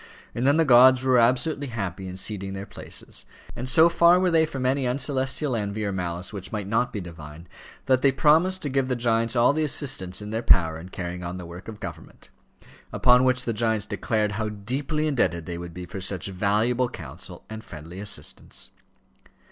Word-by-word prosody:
And 120 +3 -1
then 140 +2 +4
the 165 - +4
gods 130 0 +7
were 130 -2 +4
absolutely 130 +5 +1
happy 95 -6 -5
in 90 0 -7
ceding 95 -1 -2
their 95 +1 -6
places; - - -6 0.3
and 125 +2 -2
so 160 +5 +7
far 170 +1 +5
were 185 -1 +2
they 160 -1 +3
from 135 -3 -4
any 130 0 +1
uncelestial 135 +1 0
envy 105 0 -3
or 100 - -1
malice 90 0 -4
which 100 -3 -7
might 105 -2 -3
not 115 +4 0
be 105 - -4
divine, 85 -2 -10 0.4
that 130 -1 +3
they 135 - +4
promised 165 +7 +3
to 145 - -2
give 135 -1 0
the 130 - 0
giants 115 0 +1
all 120 +3 +4
the 155 +1 0
assistance 135 - 0
in 105 0 -7
their 110 +1 -2
power 80 -8 +3
in 90 +3 -10
carrying 90 -1 -6
on 85 +1 -5
the 90 - -8
work 85 +2 -10
of 110 -2 -8
government; - - -10 0.6
upon 125 +1 +4
which 125 0 +1
the 115 - -1
giants 110 -1 0
declared 105 +1 -1
how 110 0 -2
deeply 135 +9 -3
indebted 85 - 0
they 85 0 -5
would 85 0 -7
be 90 +2 -8
for 95 +2 -7
such 95 -1 -3
valuable 110 +6 +1
counsel 80 - -8
and 110 0 -8
friendly 80 0 -10
assistance. 100 -8 -5
115 Hz, 200 wpm, -25 LUFS, 95-130 Hz, 0.6 s, gods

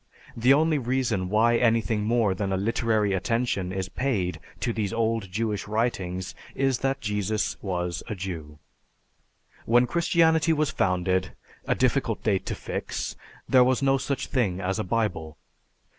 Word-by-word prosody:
The 125 +3 +3
only 155 +1 +4
reason 120 -7 -1
why 115 +3 +4
anything 115 -3 +2
more 115 -3 +2
than 95 +1 -2
a 95 - +1
literary 110 0 +1
attention 100 -2 -1
is 95 0 -3
paid 100 -7 -1 0.2
to 120 - 0
these 105 -3 -2
old 115 -3 -1
Jewish 105 0 -2
writings 95 -5 -2 0.2
is 135 -2 +1
that 135 0 -1
Jesus 105 0 -1
was 90 -3 -2
a 110 - -4
Jew. 85 -6 -6 1.1
When 120 +2 +5
Christianity 165 +1 +3
was 155 -1 +1
founded 95 -6 0 0.3
a - - +2
difficult - - 0
date 100 -3 0
to - - -2
fix - - -4 0.3
there 130 -2 +6
was 130 +2 +1
no 135 0 +3
such 140 0 -2
thing 105 -9 0
as 95 +2 -2
a - - 0
Bible. 90 -7 -2
110 Hz, 150 wpm, -26 LUFS, 95-125 Hz, 1.1 s, there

